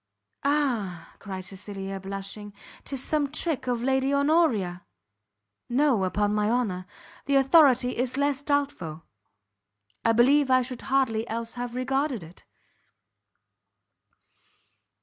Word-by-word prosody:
"Ah!" 240 - -1
cried 190 -2 -7
Cecilia, 195 0 -6
blushing, 195 +2 -7 0.3
"'tis 270 -2 -2
some 295 -3 0
trick 310 -3 -1
of 240 -1 -1
Lady 265 +1 +1
Honoria!" 280 - +2 0.9
"No, 245 -5 +2
upon 205 +2 0
my 210 0 +1
honour. 205 -7 -1 0.4
The 280 - +2
authority 270 -3 +5
is 250 +2 -2
less 285 -1 +1
doubtful; 280 - -2 1.0
I 230 - +3
believe 270 +4 +4
I 255 0 +4
should 250 -1 -6
hardly 240 -4 +1
else 230 +1 -4
have 245 -1 -5
regarded 265 - -1
it." 165 +3 -15
245 Hz, 110 wpm, -26 LUFS, 200-275 Hz, 1.0 s, authority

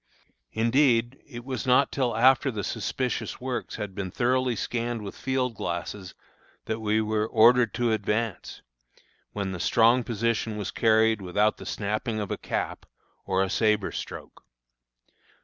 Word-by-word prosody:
Indeed, 120 +1 +2
it 120 -3 -9
was 130 -1 -4
not 130 +2 +4
till 125 -5 -1
after 130 +3 +5
the 105 -5 -4
suspicious 130 +5 -3
works 130 -1 -4
had 105 -3 -5
been 95 -1 -4
thoroughly 125 +4 +1
scanned 120 0 -3
with 100 - -7
field 130 -2 -1
glasses 95 -1 -5 0.5
that 110 0 -3
we 110 0 +1
were 110 0 0
ordered 115 0 +5
to 120 -1 +1
advance, 110 -2 -2 0.7
when 100 -2 -3
the 90 - -5
strong 115 +6 +4
position 115 -1 -1
was 105 -3 -4
carried 110 -1 +3
without 105 +4 +1
the - - -10
snapping 110 +2 -2
of 105 -2 -4
a - - -2
cap, - - -4 0.4
or 95 0 +2
a 95 - -2
sabre 105 -3 +1
stroke. - - -8
110 Hz, 150 wpm, -26 LUFS, 105-120 Hz, 0.7 s, after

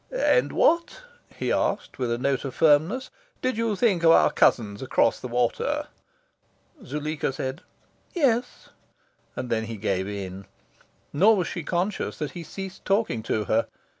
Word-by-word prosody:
"And - - +2
what," 340 +9 +2 0.3
he - - -2
asked, - - -1
with 125 -2 -1
a 120 - 0
note 135 +1 0
of 135 -3 -5
firmness, 165 - +3 0.3
"did 255 0 +1
you 225 -1 0
think 200 -5 +2
of 165 - +5
our 165 - +6
cousins 105 -4 +2
across 130 - +2
the - - -6
water?" 120 -1 -1 0.9
Zuleika 150 +1 -3
said 130 0 -5 0.5
"Yes;" 250 -7 0 0.7
and 125 -1 -5
then 110 -1 0
he 115 0 -6
gave 95 -2 -1
in. 100 -1 -6 0.7
Nor 200 +10 +5
was 185 -4 -1
she 175 - -4
conscious 180 +6 -2
that 150 - -4
he 175 - -7
ceased 190 +3 -8
talking 195 - 0
to 110 -1 -1
her. 110 +2 +1
150 Hz, 155 wpm, -25 LUFS, -, 0.9 s, our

